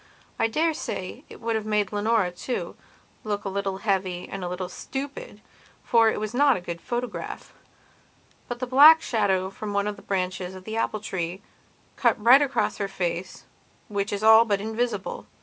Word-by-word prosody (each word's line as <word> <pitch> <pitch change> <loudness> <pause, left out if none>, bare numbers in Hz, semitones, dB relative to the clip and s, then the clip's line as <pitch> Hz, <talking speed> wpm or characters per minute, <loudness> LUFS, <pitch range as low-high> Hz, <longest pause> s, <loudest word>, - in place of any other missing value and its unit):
I - - +3
dare 320 +8 +1
say 310 - -5
it - - -12
would 230 -1 -1
have 215 -1 -3
made 210 -3 +1
Leonora, 210 -2 +1
too, 240 +8 -4 0.5
look 205 -1 -3
a - - -1
little 195 0 -2
heavy 190 -3 -1
and 195 -1 -6
a 175 - -3
little 180 0 -4
stupid, 280 - -7 0.4
for 230 -2 +4
it - - -2
was 215 +1 -4
not 275 +1 +4
a - - -4
good 170 -1 -7
photograph. 245 +2 -5 0.9
But 245 - -4
the 255 - -3
black 295 +6 +8
shadow 190 -4 0
from 205 +1 -6
one 200 0 +1
of 210 -1 -3
the - - -13
branches 185 -1 -3
of 185 - -10
the 220 +3 -6
apple 215 -2 -1
tree 185 -1 -4 0.5
cut - - +2
right 245 +6 +7
across 280 -1 0
her 200 - -2
face, 180 -1 -4 0.5
which 200 -1 -2
is 205 +1 -3
all 220 +1 +8
but 205 -3 0
invisible. 220 -1 -3
210 Hz, 185 wpm, -25 LUFS, 190-235 Hz, 0.9 s, black